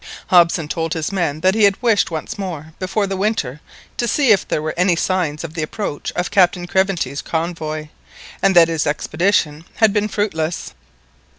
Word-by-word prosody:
Hobson 170 Hz, -3 st, +4 dB
told 165 Hz, +1 st, -2 dB
his 160 Hz, +2 st, -2 dB
men 165 Hz, -6 st, -1 dB
that 185 Hz, +2 st, +3 dB
he 220 Hz, 0 st, +2 dB
had 200 Hz, -1 st, +2 dB
wished 230 Hz, -4 st, +2 dB
once 160 Hz, +4 st, -5 dB
more 160 Hz, -5 st, -6 dB
before 195 Hz, +3 st, -1 dB
the 195 Hz, 0 st, -3 dB
winter 185 Hz, -, -2 dB, 0.4 s
to 240 Hz, -, 0 dB
see 260 Hz, +1 st, +3 dB
if 190 Hz, -8 st, +3 dB
there -, -, 0 dB
were 155 Hz, -, -2 dB
any 180 Hz, 0 st, +3 dB
signs 170 Hz, -4 st, -1 dB
of 165 Hz, -1 st, -7 dB
the 165 Hz, -, -3 dB
approach 155 Hz, -1 st, -4 dB
of 180 Hz, 0 st, -2 dB
Captain 180 Hz, -2 st, +3 dB
Craventy's 190 Hz, -6 st, 0 dB
convoy, 160 Hz, -2 st, -3 dB, 0.5 s
and 195 Hz, -1 st, +3 dB
that 170 Hz, -1 st, +8 dB
his 165 Hz, -2 st, -1 dB
expedition 155 Hz, 0 st, 0 dB
had 220 Hz, -3 st, +3 dB
been 210 Hz, 0 st, +1 dB
fruitless. 175 Hz, -6 st, -2 dB
175 Hz, 180 wpm, -19 LUFS, 155-195 Hz, 0.5 s, that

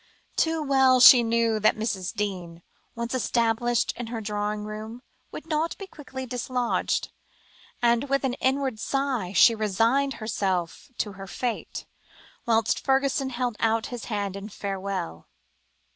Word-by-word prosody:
Too 320 Hz, -1 st, +1 dB
well 265 Hz, -2 st, +4 dB
she 245 Hz, 0 st, +10 dB
knew 230 Hz, -1 st, +1 dB
that 215 Hz, -, +3 dB
Mrs. 200 Hz, -4 st, -2 dB
Deane, 180 Hz, -5 st, -4 dB, 0.3 s
once 235 Hz, +1 st, -4 dB
established 240 Hz, -1 st, +1 dB
in 240 Hz, -1 st, -6 dB
her 230 Hz, 0 st, -4 dB
drawing 210 Hz, 0 st, -3 dB
room, 215 Hz, +3 st, -7 dB, 0.3 s
would -, -, -8 dB
not 320 Hz, +1 st, -1 dB
be 395 Hz, -, -7 dB
quickly 270 Hz, -7 st, -8 dB
dislodged, 250 Hz, 0 st, -1 dB, 0.7 s
and, 235 Hz, +3 st, +2 dB
with 275 Hz, +1 st, +1 dB
an 260 Hz, -2 st, 0 dB
inward 265 Hz, -3 st, 0 dB
sigh, 265 Hz, -8 st, -1 dB
she 215 Hz, +4 st, +6 dB
resigned 225 Hz, +6 st, +1 dB
herself 190 Hz, -6 st, -2 dB
to 210 Hz, -, -2 dB
her 195 Hz, 0 st, -10 dB
fate, 240 Hz, +4 st, -4 dB, 0.6 s
whilst 225 Hz, -2 st, +2 dB
Fergusson 270 Hz, 0 st, +1 dB
held 245 Hz, -2 st, -2 dB
out 225 Hz, 0 st, +1 dB
his 240 Hz, -, -6 dB
hand 205 Hz, -3 st, -3 dB
in 200 Hz, +2 st, -7 dB
farewell. 195 Hz, -, -5 dB
230 Hz, 140 wpm, -26 LUFS, 210-260 Hz, 0.7 s, she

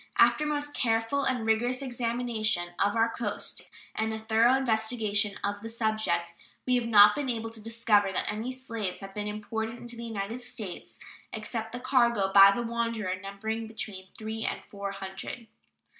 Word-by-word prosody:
After 300 Hz, -, +5 dB
a -, -, -1 dB
most 290 Hz, -1 st, -1 dB
careful 225 Hz, +4 st, +1 dB
and 250 Hz, -4 st, 0 dB
rigorous 240 Hz, +4 st, +1 dB
examination 235 Hz, -7 st, 0 dB
of 205 Hz, +1 st, +2 dB
our 225 Hz, 0 st, +4 dB
coasts 230 Hz, -2 st, -3 dB, 0.2 s
and 220 Hz, 0 st, -1 dB
a 220 Hz, -, -3 dB
thorough 225 Hz, +3 st, +4 dB
investigation 220 Hz, -4 st, +1 dB
of 205 Hz, 0 st, -2 dB
the 225 Hz, -, -6 dB
subject, 220 Hz, -7 st, 0 dB, 0.3 s
we 255 Hz, -, +2 dB
have 240 Hz, -2 st, +1 dB
not 210 Hz, -2 st, +8 dB
been 280 Hz, +1 st, -2 dB
able 225 Hz, -2 st, -2 dB
to 225 Hz, -1 st, -6 dB
discover 215 Hz, -3 st, +2 dB
that -, -, -1 dB
any 220 Hz, +4 st, -3 dB
slaves 230 Hz, -8 st, -4 dB
have 195 Hz, 0 st, -8 dB
been 210 Hz, 0 st, -3 dB
imported 220 Hz, +2 st, -4 dB
into 240 Hz, 0 st, -7 dB
the 235 Hz, -, -7 dB
United 220 Hz, +1 st, -4 dB
States 225 Hz, -6 st, -7 dB, 0.3 s
except 225 Hz, +1 st, -4 dB
the 245 Hz, -, -5 dB
cargo 235 Hz, -6 st, +2 dB
by 195 Hz, 0 st, +10 dB
the 240 Hz, +4 st, -1 dB
Wanderer, 230 Hz, -4 st, -1 dB
numbering 220 Hz, +3 st, -4 dB
between 205 Hz, -4 st, -6 dB
three 220 Hz, 0 st, -4 dB
and -, -, -3 dB
four 200 Hz, -1 st, -4 dB
hundred. 195 Hz, +4 st, -6 dB
225 Hz, 175 wpm, -29 LUFS, 205-235 Hz, 0.3 s, by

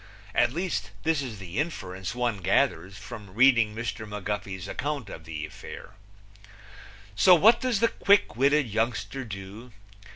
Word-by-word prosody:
At 120 Hz, 0 st, +3 dB
least, 170 Hz, -, -2 dB
this 160 Hz, -2 st, +1 dB
is 120 Hz, -6 st, -6 dB
the 95 Hz, +3 st, -5 dB
inference 95 Hz, -, -4 dB
one 120 Hz, -3 st, 0 dB
gathers 95 Hz, -1 st, +1 dB
from 105 Hz, -3 st, -10 dB
reading 115 Hz, -3 st, +5 dB
Mr. 115 Hz, -1 st, -4 dB
McGuffey's 105 Hz, -3 st, -4 dB
account 140 Hz, -4 st, -4 dB
of 80 Hz, -, -10 dB
the 80 Hz, -2 st, -5 dB
affair. 75 Hz, -, -10 dB, 1.2 s
So 180 Hz, -, +7 dB
what 220 Hz, +8 st, +5 dB
does 250 Hz, -6 st, 0 dB
the 230 Hz, -, +4 dB
quick 200 Hz, -, +3 dB
witted 140 Hz, +2 st, +3 dB
youngster 115 Hz, +4 st, -2 dB
do? 105 Hz, +3 st, -9 dB
115 Hz, 140 wpm, -27 LUFS, 95-140 Hz, 1.2 s, So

